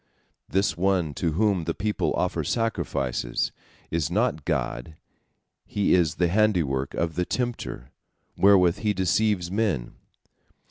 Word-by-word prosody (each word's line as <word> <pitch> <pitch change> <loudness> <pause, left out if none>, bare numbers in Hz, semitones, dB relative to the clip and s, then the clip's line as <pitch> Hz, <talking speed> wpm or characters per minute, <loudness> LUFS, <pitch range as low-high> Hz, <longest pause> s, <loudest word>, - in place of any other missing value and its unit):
This 95 -4 +1
one 90 -3 +1
to 80 +2 -1
whom 100 -2 +1
the 85 - -2
people 105 +1 -1
offer - - -1
sacrifices 70 - -1 0.4
is 80 -3 0
not 75 0 0
God, 65 -2 -2 0.7
he 100 -1 0
is 80 -4 +3
the 90 - +2
handiwork 85 -9 +1
of 85 -1 -1
the 90 - 0
tempter, 120 - -4 0.4
wherewith 95 -3 +5
he 105 -1 +1
deceives 95 -1 +1
men." 95 - -1
90 Hz, 125 wpm, -25 LUFS, 75-100 Hz, 0.7 s, wherewith